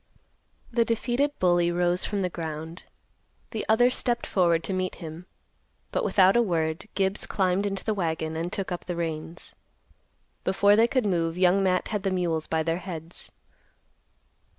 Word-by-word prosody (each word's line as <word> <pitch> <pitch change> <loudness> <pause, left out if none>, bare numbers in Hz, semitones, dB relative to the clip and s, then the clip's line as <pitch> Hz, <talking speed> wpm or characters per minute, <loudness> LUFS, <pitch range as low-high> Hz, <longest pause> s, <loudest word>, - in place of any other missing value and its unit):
The 235 -1 +3
defeated 240 +5 0
bully 175 -1 +3
rose 175 +1 +1
from 205 -2 -1
the - - +1
ground. 160 +1 -6 0.7
The 220 -3 -3
other 245 +3 +5
stepped 240 -1 0
forward 170 -3 +2
to 195 - -3
meet 185 0 -2
him. 165 +2 -9 0.6
But - - 0
without 190 - +4
a 240 - +5
word, 165 -3 -1
Gibbs 195 +1 0
climbed 190 +1 +1
into 195 -1 -4
the 220 - 0
wagon 160 -4 -2
and 165 +2 -3
took 195 -2 -3
up 175 - -4
the 180 - -3
reins. 165 0 -5 0.9
Before 200 +2 +4
they 225 +2 +5
could 255 -1 0
move, 170 -3 0
Young 185 +1 +4
Matt 185 -1 +1
had 210 -2 -1
the 195 - 0
mules 175 -4 -1
by 160 0 0
their 165 +2 -1
heads. 170 -2 -5
180 Hz, 165 wpm, -26 LUFS, 165-205 Hz, 0.9 s, other